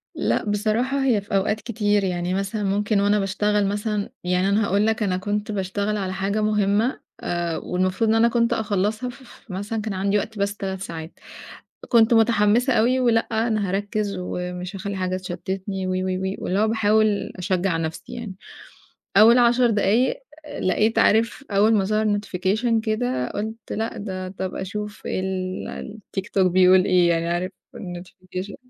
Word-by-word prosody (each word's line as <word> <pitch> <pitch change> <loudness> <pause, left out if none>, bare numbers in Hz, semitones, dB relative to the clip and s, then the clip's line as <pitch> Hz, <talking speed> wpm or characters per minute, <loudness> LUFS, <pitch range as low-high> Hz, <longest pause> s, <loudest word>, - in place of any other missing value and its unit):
لأ، - - 0
بصراحة 225 +7 0
هي 225 -6 +3
في 200 0 -4
أوقات 210 +2 +1
كتير، 210 -3 0
يعني 180 -1 -1
مثلًا 195 +2 -2
ممكن 205 +1 +1
وأنا 205 +1 +3
باشتغل 205 +1 +1
مثلًا 205 0 -2
يعني 180 +2 +1
أنا 205 +1 +2
هاقول 200 +3 +2
لك 220 0 0
أنا 185 -2 0
كنت 205 +2 -2
باشتغل 200 +2 -2
على 190 -2 -3
حاجة 200 +2 -1
مهمّة 210 +3 +1 0.2
آآ، 170 -1 -2
والمفروض 185 +4 0
إن 225 - +4
أنا 230 +1 +5
كنت 235 0 +2
أخلّصها 215 +2 -1
ف 260 +2 -12
ف 240 -4 -15
مثلًا 205 +4 -3
كان 210 -2 -3
عندي 200 +2 +1
وقت 215 +1 -4
بس 200 +1 -1
3 190 -1 -4
ساعات، 160 -2 -7 0.7
كنت 230 -1 +5
متحمّسة 225 +2 +3
أوي 250 +4 +3
ولأ، 230 -2 +2 0.2
أنا 215 -4 0
هاركّز 205 +1 -2
ومش 180 +1 -5
هاخلّي 200 0 -4
حاجة 185 0 -1
تشتّتني 190 +1 -4
وي، 185 0 -1
وي، 185 0 -1
وي، 190 +1 -2
واللي 190 +3 -1
هو 220 - +3
باحاول 215 -1 +2
أشجّع 185 -2 0
نَفْسي 165 +9 -5
يعني، 235 -6 -6 0.8
أول 225 +4 +8
10 240 0 +4
دقايق 225 - +2 0.4
لقيت 215 +4 +1
عارف 230 +6 +3
أول 210 +3 +4
ما 195 -2 +3
ظَهَر 215 0 +1
notification 210 +4 0
كده 220 - -1
قُلت 220 +2 -5
لأ، 225 +1 -3
ده 185 -2 -5
طَب 185 0 -5
أشوف 210 +2 -5
ال 190 +3 -4 0.2
الtiktok 195 0 0
بيقول 185 +1 +5
إيه 180 -2 +4
يعني 170 0 +1
عارف 175 +2 -1 0.3
الnotification 185 +2 -7
205 Hz, 165 wpm, -23 LUFS, 185-220 Hz, 0.8 s, أول